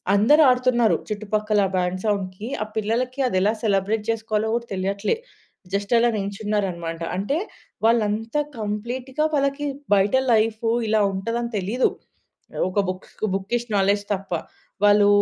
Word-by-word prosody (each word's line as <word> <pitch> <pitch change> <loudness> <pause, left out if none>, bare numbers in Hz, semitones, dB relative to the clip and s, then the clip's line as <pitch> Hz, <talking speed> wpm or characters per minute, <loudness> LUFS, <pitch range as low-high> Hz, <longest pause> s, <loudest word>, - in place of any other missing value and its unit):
అందరూ 265 +10 +5
ఆడుతున్నారు 250 -2 +3
చుట్టుపక్కల. 210 0 0
ఆ - - -8
బ్యాండ్ 180 +1 -1
సౌండ్‌కి 200 0 -2 0.2
ఆ - - -6
పిల్లలకి 240 +5 -1
అదెలా 200 0 +2
సెలబ్రేట్ 210 +1 +1
చేసుకోవాలో 220 -1 -1
కూడా 235 0 -3
తెలియట్లే. 195 - -1 0.6
జస్ట్ 200 +3 -1
అలా 235 +1 +4
నిల్చున్నారన్నమాట. 195 -5 -2 0.2
అంటే 240 +11 0 0.5
వాళ్ళు 230 -1 +4
అంతా 225 +7 -1 0.2
కంప్లీట్‌గా 245 +7 -2
వాళ్ళకి 280 +1 0 0.3
బయట 195 +1 +2 0.2
లైఫ్ 220 0 +1 0.2
ఇలా 215 -1 +3
ఉంటదని 230 +5 -2
తెలీదు. 210 +7 +1 0.8
ఒక 195 +2 0
బుక్స్, 185 0 -7 0.2
బుకిష్ 235 +5 -2
నాలెడ్జ్ 200 +1 +2
తప్ప. 195 -1 -6 0.5
వాళ్ళు 205 0 +6
215 Hz, 125 wpm, -23 LUFS, 200-235 Hz, 0.8 s, వాళ్ళు